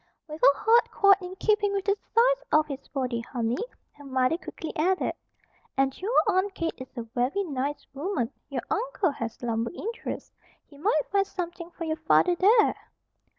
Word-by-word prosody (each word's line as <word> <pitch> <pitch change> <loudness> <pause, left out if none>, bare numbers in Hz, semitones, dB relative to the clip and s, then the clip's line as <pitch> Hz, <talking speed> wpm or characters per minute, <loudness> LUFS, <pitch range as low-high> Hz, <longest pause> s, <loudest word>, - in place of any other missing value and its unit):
"With 310 +1 -8
a 280 - +6
heart 465 +2 +4
quite 395 -1 +5
in 365 +1 -7
keeping 415 0 +2
with 395 -1 -1
the 400 0 +3
size - - +2
of 305 0 +5
his 275 -2 -7
body, 255 -4 -2
honey," 235 - -2 0.3
her 290 - -16
mother 260 +1 +1
quickly 330 -2 -7
added. 365 +4 +1 0.6
"And 270 0 +2
your 430 +6 -1
Aunt 385 0 +1
Kate 330 -1 -2
is 260 - -7
a 235 - -2
very 245 - -1
nice 285 -3 -3
woman. 280 - -2 0.2
Your 260 -4 -3
uncle 430 -5 0
has 230 -3 -6
lumber 230 -1 -1
interests. 450 +6 -6 0.3
He 285 - -17
might 310 -3 +2
find 395 -1 +2
something 345 -2 -5
for 345 - -8
your 315 -1 -2
father 320 +3 +4
there." 425 +5 +5
330 Hz, 175 wpm, -27 LUFS, 270-400 Hz, 0.6 s, a